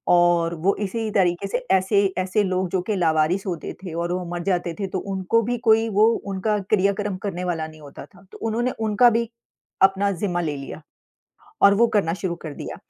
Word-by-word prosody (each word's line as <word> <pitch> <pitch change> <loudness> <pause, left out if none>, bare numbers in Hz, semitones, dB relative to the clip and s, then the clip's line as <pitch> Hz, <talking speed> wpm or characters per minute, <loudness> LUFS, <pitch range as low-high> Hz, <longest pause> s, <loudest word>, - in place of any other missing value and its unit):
और 175 -1 +3
वो 195 - +4
इसी 220 +2 -3
तरीक़े 185 0 +1
से 245 +5 -3
ऐसे 200 +2 +2
ऐसे 190 +3 +1
लोग 185 -1 -1
जो 185 - 0
कि 210 - +1
लावारिस 165 +2 +1
होते 170 -3 -4
थे 175 -4 -6
और 170 +1 -2
वो 180 0 -3
मर 175 - -4
जाते 175 -3 -1
थे 195 - -2
तो 185 0 -3 0.2
उनको 190 +5 +1
भी 245 - 0
कोई 225 +1 +4
वो 210 +1 +4 0.3
उनका 210 +2 0
क्रिया-कर्म 200 -1 +1
करने 180 -2 -4
वाला 160 -3 -2
नहीं 155 -1 -14
होता 140 -1 -11
था। 190 -1 -21
तो - - -9
उन्होंने 240 +3 0
उनका 220 +2 +4
भी 230 0 0 0.6
अपना 200 +1 -1
ज़िम्मा 180 -1 -2
ले 150 -4 -2
लिया 140 +3 -8 0.8
और 200 - +7
वो 235 +3 +5
करना 165 -5 +2
शुरू 180 -2 -3
कर 155 - -6
दिया। - - -7
190 Hz, 205 wpm, -23 LUFS, 175-205 Hz, 0.8 s, और